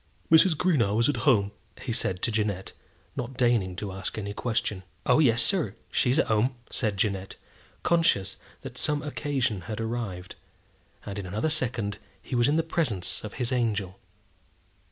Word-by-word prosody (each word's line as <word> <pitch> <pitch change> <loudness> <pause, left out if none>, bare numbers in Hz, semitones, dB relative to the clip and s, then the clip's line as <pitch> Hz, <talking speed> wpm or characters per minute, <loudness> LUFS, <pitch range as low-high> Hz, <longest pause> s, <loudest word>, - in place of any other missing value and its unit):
"Mrs. 165 +1 +7
Greenow 120 - +2
is 115 - +4
at 145 - +1
home," 100 -5 +3 0.3
he 120 - -3
said 95 -5 -1
to 115 - +2
Jeannette, 105 -3 -1 0.4
not 125 +1 -5
deigning 120 -8 +2
to 100 +1 -4
ask 95 +3 -5
any 100 -1 -3
question. 110 -4 -1 0.2
"Oh, - - +5
yes, 120 -6 +5
sir; 160 - +2 0.2
she - - +2
is 130 - +3
at - - +4
home," 115 +4 +2 0.2
said 105 -5 -1
Jeannette, 95 -1 -1 0.5
conscious 165 - +3 0.3
that - - -8
some 150 -1 0
occasion 140 -8 -1
had 110 - -3
arrived; 110 -6 -4 0.7
and 100 0 -5
in 95 - -5
another 110 - -1
second 115 -8 -1 0.2
he - - -9
was 120 -1 +4
in 150 - +3
the 165 - +3
presence 120 - -2
of 110 - -7
his 125 -1 -1
angel. 105 -6 0
115 Hz, 170 wpm, -27 LUFS, 100-135 Hz, 0.7 s, Mrs